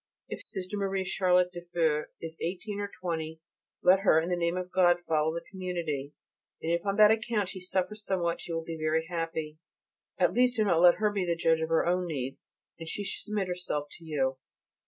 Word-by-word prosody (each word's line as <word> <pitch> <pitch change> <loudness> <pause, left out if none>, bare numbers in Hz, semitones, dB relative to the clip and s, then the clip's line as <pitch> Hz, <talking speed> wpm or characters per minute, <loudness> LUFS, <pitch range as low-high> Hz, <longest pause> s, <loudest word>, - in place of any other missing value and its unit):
If - - -5
Sister 195 +2 -3
M. 195 -1 0
Charlotte 180 -1 +3
(de 175 - -6
Feu) 165 -3 0
is 165 -1 -6
eighteen 200 +4 -3
or 205 0 -3
twenty 160 -2 -3 0.4
let 185 +2 +6
her 190 -5 +5
in 165 +2 -2
the 180 - +1
name 170 0 0
of 180 0 -4
God 175 -2 +5
follow 155 0 +2
the 170 +1 -5
community, 170 -7 -4 0.5
and 165 - -2
if 170 0 +1
on 200 - +1
that 215 0 +7
account 220 -3 0
she 190 - -6
suffers 190 +3 -2
somewhat 175 -4 -1
she - - -7
will 165 0 -2
be 165 -1 -6
very 160 +1 +1
happy. 165 -2 -4 0.6
At 180 -1 +3
least 250 +2 +3
do 220 - +2
not 170 -5 +3
let 175 -1 +8
her 215 -1 +1
be 200 -2 -1
the 170 - +1
judge 165 -1 +2
of 160 - -1
her 165 - +3
own 180 +1 +1
needs, 135 -5 -5 0.3
and 165 -1 -6
she 205 - -3
should 190 - -5
submit 210 -3 -1
herself 175 -5 -3
to - - -16
you. 135 -4 -1
175 Hz, 215 wpm, -29 LUFS, 160-190 Hz, 0.6 s, let